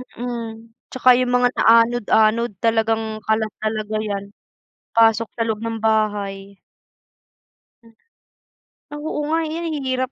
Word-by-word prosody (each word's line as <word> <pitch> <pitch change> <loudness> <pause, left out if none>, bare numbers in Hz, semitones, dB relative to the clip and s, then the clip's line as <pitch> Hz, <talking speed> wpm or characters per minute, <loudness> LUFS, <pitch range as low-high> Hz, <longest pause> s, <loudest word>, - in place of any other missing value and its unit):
Mm. 230 -2 -6 0.2
Tsaka 255 -1 +5
yung 250 -1 0
mga 245 0 +4
na-anod-anod, 230 0 +3
talagang 225 0 +1 0.2
kalat 220 -1 0
talaga 215 0 -3
yan, 200 -2 -3 0.7
pasok 225 0 +4
sa 230 - -2
loob 215 -1 -1
ng 225 -1 -4
bahay. 205 -3 -1 1.2
Hmm. 230 0 -20 1.0
Oo 300 +1 -4
nga, 325 - +2
eh, 310 - -5
yan 320 -4 -4
hirap 260 0 -1
225 Hz, 120 wpm, -21 LUFS, 215-245 Hz, 1.2 s, Tsaka